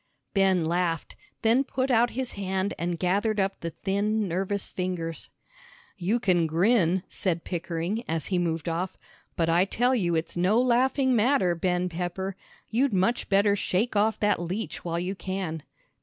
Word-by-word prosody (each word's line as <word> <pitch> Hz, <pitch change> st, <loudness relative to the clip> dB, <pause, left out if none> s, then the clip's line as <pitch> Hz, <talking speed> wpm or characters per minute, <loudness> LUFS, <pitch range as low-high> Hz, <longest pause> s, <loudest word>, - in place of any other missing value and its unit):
Ben 190 Hz, -4 st, +3 dB
laughed, 170 Hz, -1 st, -1 dB, 0.3 s
then 230 Hz, +4 st, +4 dB
put 260 Hz, -1 st, -1 dB
out 240 Hz, 0 st, +4 dB
his 255 Hz, +1 st, -4 dB
hand 190 Hz, 0 st, -2 dB
and 170 Hz, 0 st, -1 dB
gathered 205 Hz, +5 st, +1 dB
up 195 Hz, 0 st, 0 dB
the 170 Hz, -, -3 dB
thin 205 Hz, +4 st, -1 dB
nervous 190 Hz, +3 st, -1 dB
fingers. 180 Hz, -4 st, -3 dB, 0.7 s
"You 205 Hz, +5 st, 0 dB
can 180 Hz, -7 st, +2 dB
grin," 180 Hz, +1 st, +2 dB
said 170 Hz, -3 st, -2 dB
Pickering, 175 Hz, +5 st, -3 dB
as 160 Hz, -2 st, -2 dB
he 180 Hz, -, +3 dB
moved 165 Hz, -1 st, -1 dB
off, 170 Hz, +2 st, -2 dB, 0.4 s
"but 165 Hz, -, +1 dB
I 170 Hz, +2 st, +4 dB
tell 245 Hz, +5 st, +1 dB
you 175 Hz, -9 st, +1 dB
it's 160 Hz, +1 st, -2 dB
no 185 Hz, +6 st, +3 dB
laughing 255 Hz, +1 st, +3 dB
matter, 230 Hz, -5 st, +3 dB
Ben 180 Hz, +1 st, 0 dB
Pepper. 180 Hz, +2 st, -4 dB, 0.3 s
You'd 250 Hz, +2 st, +1 dB
much 190 Hz, +6 st, +1 dB
better 200 Hz, +1 st, +4 dB
shake 205 Hz, +4 st, 0 dB
off 215 Hz, +2 st, +2 dB
that 205 Hz, -4 st, +2 dB
leech 185 Hz, +6 st, -4 dB
while 170 Hz, -1 st, -2 dB
you 180 Hz, +2 st, -2 dB
can." 185 Hz, -4 st, -4 dB
190 Hz, 160 wpm, -27 LUFS, 175-215 Hz, 0.7 s, then